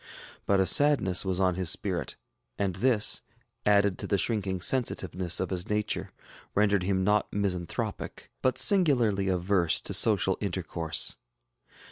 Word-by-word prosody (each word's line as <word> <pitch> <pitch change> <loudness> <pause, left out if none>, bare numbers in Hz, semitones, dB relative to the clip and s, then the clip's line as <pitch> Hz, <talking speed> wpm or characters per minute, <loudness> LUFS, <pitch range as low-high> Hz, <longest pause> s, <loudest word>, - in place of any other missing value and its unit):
But 100 -1 +2
a 95 - +3
sadness 95 -4 +3
was 95 -1 0
on 95 -1 +2
his 90 -2 0
spirit; - - -2 0.4
and 95 -3 -2
this, 115 -1 +2 0.5
added 100 -2 +2
to - - -5
the 100 - +1
shrinking 95 -3 -1
sensitiveness 90 -5 -1
of 95 - -3
his 90 +2 -4
nature, 105 0 -2 0.4
rendered 100 -1 +2
him 95 0 -1
not 105 +1 +1
misanthropic, 90 -4 -4
but 130 -1 0
singularly 120 - +4
averse 90 -2 +1
to - - -3
social - - +2
intercourse. 80 -2 -2
95 Hz, 135 wpm, -27 LUFS, 90-105 Hz, 0.5 s, singularly